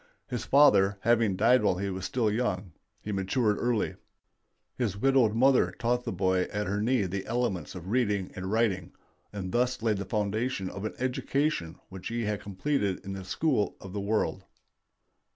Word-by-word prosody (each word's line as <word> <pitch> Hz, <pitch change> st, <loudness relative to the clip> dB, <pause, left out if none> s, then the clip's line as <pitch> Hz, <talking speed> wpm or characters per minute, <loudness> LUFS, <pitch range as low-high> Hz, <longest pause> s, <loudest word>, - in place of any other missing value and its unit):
His 125 Hz, -4 st, -4 dB
father 100 Hz, -9 st, +5 dB
having 115 Hz, -4 st, +3 dB
died 120 Hz, +6 st, +4 dB
while 100 Hz, -4 st, +2 dB
he 100 Hz, +1 st, -2 dB
was 95 Hz, 0 st, -4 dB
still 110 Hz, +2 st, 0 dB
young, 105 Hz, -5 st, -1 dB, 0.3 s
he 105 Hz, -, -4 dB
matured 105 Hz, +3 st, +1 dB
early. 120 Hz, -3 st, 0 dB, 0.8 s
His 110 Hz, -6 st, -1 dB
widowed 125 Hz, -2 st, +3 dB
mother 125 Hz, -7 st, +4 dB
taught 120 Hz, +1 st, 0 dB
the -, -, -2 dB
boy 95 Hz, 0 st, +1 dB
at 105 Hz, 0 st, -2 dB
her 100 Hz, +2 st, -1 dB
knee 120 Hz, 0 st, +2 dB
the 95 Hz, +1 st, -3 dB
elements 110 Hz, -8 st, -2 dB
of 90 Hz, +1 st, -7 dB
reading 105 Hz, -6 st, +1 dB
and 95 Hz, +1 st, -4 dB
writing, 105 Hz, -6 st, 0 dB, 0.4 s
and 95 Hz, -3 st, -5 dB
thus 125 Hz, 0 st, 0 dB
laid 110 Hz, -3 st, +2 dB
the 100 Hz, -, -4 dB
foundation 105 Hz, 0 st, -1 dB
of 100 Hz, +2 st, -6 dB
an 110 Hz, -, -4 dB
education 130 Hz, -, -1 dB
which 95 Hz, -1 st, -7 dB
has 115 Hz, -, -3 dB
been 105 Hz, -3 st, -1 dB
completed 100 Hz, 0 st, -1 dB
in 95 Hz, -, -4 dB
the 95 Hz, -1 st, -6 dB
school 110 Hz, -, 0 dB
of 95 Hz, -1 st, -10 dB
the 100 Hz, -, -2 dB
world. 105 Hz, +2 st, -1 dB
105 Hz, 175 wpm, -28 LUFS, 95-120 Hz, 0.8 s, father